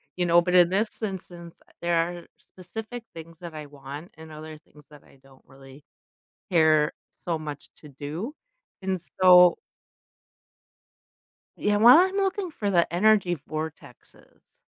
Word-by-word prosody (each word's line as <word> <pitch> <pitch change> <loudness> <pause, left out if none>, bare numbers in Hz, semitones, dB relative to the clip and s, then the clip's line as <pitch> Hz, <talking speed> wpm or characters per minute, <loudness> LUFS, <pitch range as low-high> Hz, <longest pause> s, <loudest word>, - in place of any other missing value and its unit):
you 180 - 0
know, 170 0 +5
but 180 +1 -2
in 175 -1 +6
this 210 +5 -1
instance, 175 -5 -7
uh, - - -24
there 170 0 0
are 175 +1 -2
specific 220 +6 -9
things 165 0 -12
that 170 -2 -9
I 155 -1 -7
want, 145 +3 -10
and 160 0 -12
other 155 0 -10
things 150 -1 -21
that 150 -1 -16
I 135 - -22
don't 135 -1 -21
really 135 +1 -16 0.7
care 155 -3 +3 0.2
so 170 -2 -4
much 150 -2 -8
to 150 - -14
do, 155 - -7 0.5
and 190 -1 -2 0.2
so 180 -1 +7 2.0
Yeah, 210 0 0
while 240 +7 +8
I'm 375 +1 +2
looking 390 -1 -1
for 205 -9 -3
the 170 -2 +2
energy 185 -1 +3
vortexes. 155 -3 -10
170 Hz, 145 wpm, -25 LUFS, 155-190 Hz, 2.0 s, while